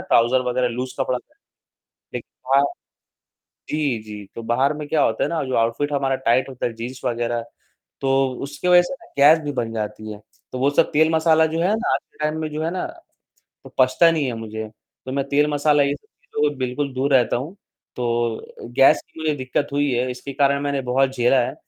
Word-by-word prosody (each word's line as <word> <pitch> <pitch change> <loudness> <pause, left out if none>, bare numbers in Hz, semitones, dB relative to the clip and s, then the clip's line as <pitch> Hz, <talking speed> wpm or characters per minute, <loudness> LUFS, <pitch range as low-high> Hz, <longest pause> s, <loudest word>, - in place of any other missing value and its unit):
Trouser 120 +3 +3
वगैरह 125 0 +1
loose 125 +2 -4
कपड़ा। 130 -1 0 1.0
लेकिन - - -6 0.2
बाहर 140 +1 +5 1.1
जी, 145 -6 0
जी, 105 -1 -9
तो 115 - -6
बाहर 130 +5 +2
में 150 0 -6
क्या 150 -1 +2
होता 110 - +1
है - - -1
ना 165 -2 -1
जो 130 -1 -3
ऑउटफिट 115 +6 0
हमारा 135 -1 +1
टाइट 125 +4 +3
होता 130 -2 -3
है, 120 - -3
जीन्स 120 +3 -7
वगैरह 120 -1 -1 0.6
तो 135 0 +2
उसकी 145 +5 -4
वजह 180 0 +7
से 175 - -5
ना - - -16
गैस 150 +4 +7
भी 145 - -2
बन 115 -4 -2
जाती 110 0 -4
है। 105 - -10 0.3
तो 130 - -4
वो 135 +2 +3
सब 160 +3 +2
तेल 160 +1 +4
मसाला 160 0 +4
जो 165 - 0
है 185 +5 +2
ना 225 - -1
आज - - 0
के - - -27
टाइम 155 +1 -1
में 155 - -2
जो 155 +1 -4
है 165 - 0
ना, 185 - -3 0.8
वो - - -14
पचता 130 +6 +5
नहीं 155 -4 0
है 125 - -2
मुझे, 110 -1 -6 0.4
तो 130 - -4
मैं 140 0 0
तेल 145 +2 +3
मसाला 145 0 +3
ये 140 0 +1
सब - - -15
चीज़ों 445 -1 -2
से - - -9
बिल्कुल 130 +2 -2
दूर 135 +2 0
रहता 125 -3 +3
हूँ। 150 +11 -6 0.4
तो 120 -2 0
अ, - - -14
गैस 120 +3 +4
की 160 - -13
मुझे 155 -1 0
दिक्कत 130 +2 -2
हुई 145 0 +1
है 125 +1 0
इसके 125 +2 -7
कारण 140 +1 +2
मैंने 140 -1 -1
बहुत 130 +2 +2
झेला 125 +2 +4
है - - -5
135 Hz, 220 wpm, -22 LUFS, 120-150 Hz, 1.1 s, वजह